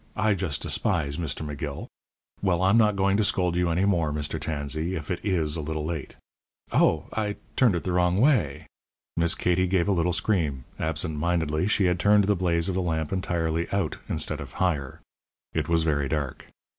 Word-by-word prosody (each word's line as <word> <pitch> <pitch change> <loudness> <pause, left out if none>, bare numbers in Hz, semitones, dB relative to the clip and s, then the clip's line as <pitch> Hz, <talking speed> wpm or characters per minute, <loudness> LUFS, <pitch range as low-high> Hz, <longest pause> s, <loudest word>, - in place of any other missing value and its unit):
I 110 0 +2
just 90 -7 -2
despise 70 0 0
Mr. 80 -2 -2
McGill. 75 -1 -5 0.6
Well, 95 -2 +1
I'm 95 +3 +4
not 105 -3 +4
going 100 0 +2
to 110 - +2
scold 90 -3 +1
you 90 -1 +1
any 90 +4 +1
more, 85 -6 +1
Mr. 75 0 -2
Tansey, 80 +4 -2
if 75 -1 -5
it 90 - -3
is 85 -7 +1
a 80 - -3
little 75 0 -3
late 80 -3 -5 0.6
Oh! - - +3
I 105 -2 -1 0.2
turned 120 -8 +4
it 85 - -2
the 90 - -2
wrong 90 +1 +2
way!" 90 - +2 0.5
Miss 85 0 +2
Katie 90 +1 +1
gave 90 -1 +1
a - - +2
little 90 -2 +1
scream. 85 - 0 0.2
Absent 80 -1 -2
mindedly 80 0 0
she 105 -2 +2
had 90 -1 +1
turned 105 +2 +5
the 100 +1 +2
blaze 85 -2 +1
of 95 - -1
the 95 - 0
lamp 80 -1 -2
entirely 85 -3 -1
out 100 -1 -1
instead - - -1
of - - -9
higher. 75 -8 -1 0.5
It - - -1
was 85 -1 +3
very 75 -3 0
dark. 75 -4 -3
85 Hz, 195 wpm, -26 LUFS, 80-95 Hz, 0.6 s, turned